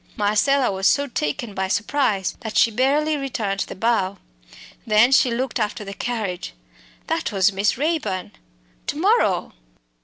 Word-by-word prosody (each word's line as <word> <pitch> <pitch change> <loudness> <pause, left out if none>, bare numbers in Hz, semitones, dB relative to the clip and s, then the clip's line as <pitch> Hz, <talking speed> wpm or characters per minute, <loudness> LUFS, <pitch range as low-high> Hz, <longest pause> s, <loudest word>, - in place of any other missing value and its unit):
Marcella 240 +6 +2
was 190 0 +1
so 285 - +3
taken 210 - -3
by 190 0 -2
surprise 205 0 0
that 220 -1 -4
she 230 - +5
barely 290 +6 +1
returned 220 -8 -3
the - - -8
bow. 200 -2 0 0.7
Then 220 +4 +5
she 265 -1 +5
looked 245 +1 -2
after 210 0 -2
the 195 - -6
carriage. 200 - -4 0.5
That - - -2
was 195 0 +2
Miss 200 +3 +1
Raeburn. 275 - -2 0.6
To - - -2
morrow! - - +2
215 Hz, 145 wpm, -22 LUFS, 195-260 Hz, 0.7 s, she